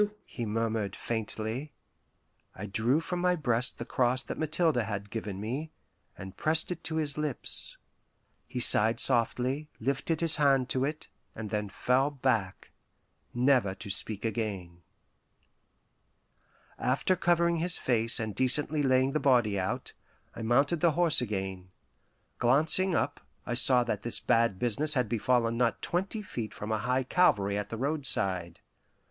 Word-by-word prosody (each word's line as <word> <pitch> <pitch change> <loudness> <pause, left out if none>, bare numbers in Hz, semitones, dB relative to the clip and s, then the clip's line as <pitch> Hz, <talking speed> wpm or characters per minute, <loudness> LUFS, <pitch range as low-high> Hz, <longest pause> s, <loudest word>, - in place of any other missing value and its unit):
"Jesu 210 0 0
" - - -41
he 120 - -6
murmured 110 -2 -2
faintly. 115 +4 -4 0.8
I 95 - -6
drew 115 +9 +1
from 175 +2 -4
my 180 0 +2
breast 125 -6 -1
the 120 - -6
cross 125 +1 0
that - - -7
Mathilde 155 -1 +1
had 105 -3 -3
given 105 -4 -5
me, 130 +9 -4 0.5
and 95 0 -9
pressed 160 +2 0
it 175 -1 -5
to 160 - -2
his 150 -2 -1
lips. 150 -4 -3 0.7
He 125 - -5
sighed 115 -1 +5
softly, 130 +5 +2
lifted 140 +6 -1
his 165 -2 +3
hand 135 -4 +3
to 130 0 0
it, 150 +2 -5 0.3
and 110 -2 -6
then 105 -1 -2
fell 125 +7 +1
back, 120 -9 -2 0.6
never 120 -6 +2
to 100 0 -6
speak 105 +2 -1
again. 100 -6 -4 2.0
After 135 +8 +1
covering 170 -1 +2
his 175 +2 -1
face 115 -2 +1
and 110 -2 -3
decently 145 +6 +2
laying 130 -1 +2
the 155 - 0
body 120 -8 +2
out, 95 +1 -4 0.4
I - - -7
mounted 140 +8 +2
the 170 -2 +3
horse 165 -4 +4
again. 95 -5 -4 0.7
Glancing 160 +9 +3
up, 145 - -1 0.3
I 120 - -3
saw 125 0 +5
that 110 -4 -3
this 120 - -2
bad 115 -4 +2
business 140 +8 0
had 125 -3 +1
befallen 115 +1 +1
not 120 -1 0
twenty 195 +5 -2
feet 115 - -6
from 105 +1 -6
a 110 - 0
high 125 +4 0
Calvary 105 - +2
at 105 0 -3
the 115 - -5
roadside. 100 - -1
125 Hz, 155 wpm, -29 LUFS, 110-150 Hz, 2.0 s, sighed